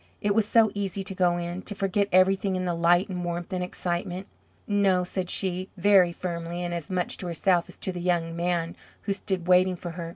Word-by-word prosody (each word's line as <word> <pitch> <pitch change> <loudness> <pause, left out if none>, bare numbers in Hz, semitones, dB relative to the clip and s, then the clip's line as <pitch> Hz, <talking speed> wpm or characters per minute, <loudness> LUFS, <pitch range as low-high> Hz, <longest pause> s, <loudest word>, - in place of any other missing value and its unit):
It 205 0 +1
was 215 0 +2
so 220 -1 +4
easy 195 -1 -3
to 195 - -3
go 180 -2 +2
in, 175 +1 -4
to 205 - -6
forget 200 +1 0
everything 190 +1 +3
in 185 0 -2
the 175 - 0
light 175 +3 +3
and 180 -3 -4
warmth 175 +1 -4
and 180 -1 -1
excitement. 180 +1 -3 0.4
"No," 195 -3 +3
said 180 0 -4
she, 185 0 -1
very 185 -1 +5
firmly, 170 0 -4
and 175 0 -3
as 170 -3 -5
much 180 -2 -1
to 180 - -5
herself 175 +1 +2
as - - -11
to 190 - -3
the 180 -1 -6
young 170 -2 0
man 170 -1 -1 0.3
who 200 - 0
stood 190 -3 -3
waiting 185 0 +4
for 175 0 -7
her. 165 0 -6
180 Hz, 220 wpm, -26 LUFS, 175-195 Hz, 0.4 s, very